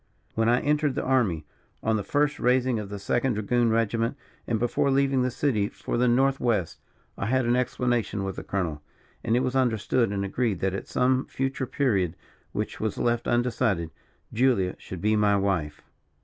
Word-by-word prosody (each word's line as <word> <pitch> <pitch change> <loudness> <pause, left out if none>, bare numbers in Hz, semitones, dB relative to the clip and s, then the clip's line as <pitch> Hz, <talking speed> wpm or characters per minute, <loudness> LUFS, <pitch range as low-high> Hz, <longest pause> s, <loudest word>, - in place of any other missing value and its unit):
When 115 +1 +2
I 120 +1 +3
entered 150 -1 +1
the - - -1
army, 105 - +1 0.4
on 110 0 +2
the 105 - -1
first 145 +7 0
raising 125 -1 +2
of 105 -2 -6
the 100 - -5
second 120 +5 0
dragoon 115 +3 +1
regiment, 115 +3 0 0.3
and 115 - +1
before 120 +4 +1
leaving 135 -1 +2
the 125 - +1
city 120 -5 0
for - - -5
the 125 +1 +3
north 135 +3 +3
west, 105 -9 0 0.4
I - - -1
had 130 +1 +2
an 120 +1 +2
explanation 120 -4 0
with 95 -1 -3
the - - -6
colonel; 85 -6 -2 0.4
and 115 - +1
it - - +2
was 130 0 -1
understood, 120 -2 +1
and 100 -1 -1
agreed, 105 -1 -1
that 95 -1 0
at 100 - -5
some 130 +1 +1
future 135 0 -2
period, 100 - 0 0.4
which - - -4
was 110 -2 -2
left 120 0 0
undecided, 115 -8 0 0.4
Julia 115 -6 +2
should 90 -2 -8
be 105 +2 +2
my 105 -1 +3
wife. 90 -7 -1
120 Hz, 185 wpm, -26 LUFS, 100-130 Hz, 0.4 s, I